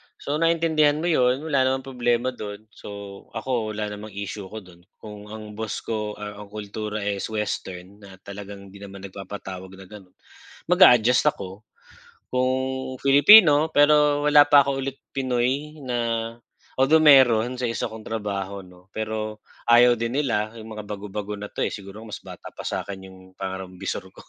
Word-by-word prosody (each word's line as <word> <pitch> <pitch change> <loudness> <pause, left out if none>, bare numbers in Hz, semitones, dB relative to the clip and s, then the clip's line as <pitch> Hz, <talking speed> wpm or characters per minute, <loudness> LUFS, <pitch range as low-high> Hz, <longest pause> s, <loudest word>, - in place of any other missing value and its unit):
So 145 +2 -3
naintindihan 160 -3 +3
mo 170 +3 -1
'yon, 130 -1 +2
wala 140 -5 +2
namang 130 0 -1
problema 125 -1 0
do'n. 105 -3 -8
So 100 -1 -10
ako 115 -2 -2
wala 105 0 -3
namang 105 0 -9
issue 100 0 -6
ko 110 +2 -9
do'n 90 -2 -17 0.2
kung 105 -1 -11
ang 105 0 -9
boss 110 -1 -4
ko 105 -2 -3
ang 105 0 -8
kultura 105 +1 -5
is 100 -1 -2
Western 100 -3 -5
na 100 -2 -13
talagang 100 -1 -10
hindi 100 - -13
naman 100 -1 -10
nagpapatawag 95 -1 -8
na 95 - -12
gano'n, 95 -1 -14 0.6
mag-a-adjust 125 - +6
ako. 95 -3 -8 0.7
Kung 130 0 +1 0.5
Filipino 150 +2 +7
pero 145 0 +4
wala 145 0 +8
pa 145 0 +6
ako 135 -1 -1
ulit 135 0 -6 0.2
Pinoy 135 +4 -1
na 125 -3 -3 0.8
although 135 +5 +4
meron 130 -5 +5
sa 125 - -4
isa 115 -1 -2
kong 110 -1 -10
trabaho 100 -3 -4
ano 90 +1 -18
pero 110 0 -4 0.2
ayaw 120 +1 +6
din 115 +1 -3
nila 110 -6 -1
yung 110 - -10
mga 105 - -6
bago-bago 105 0 -6
na 105 - -6
'to - - -3
siguro 100 +2 -9
mas 110 - -8
bata - - -11
pa - - -10
sa - - -3
akin 95 -1 -8
'yong 95 0 -14
pangarang 95 -1 -7
bisor - - -3
ko - - -15
110 Hz, 165 wpm, -24 LUFS, 100-130 Hz, 0.8 s, wala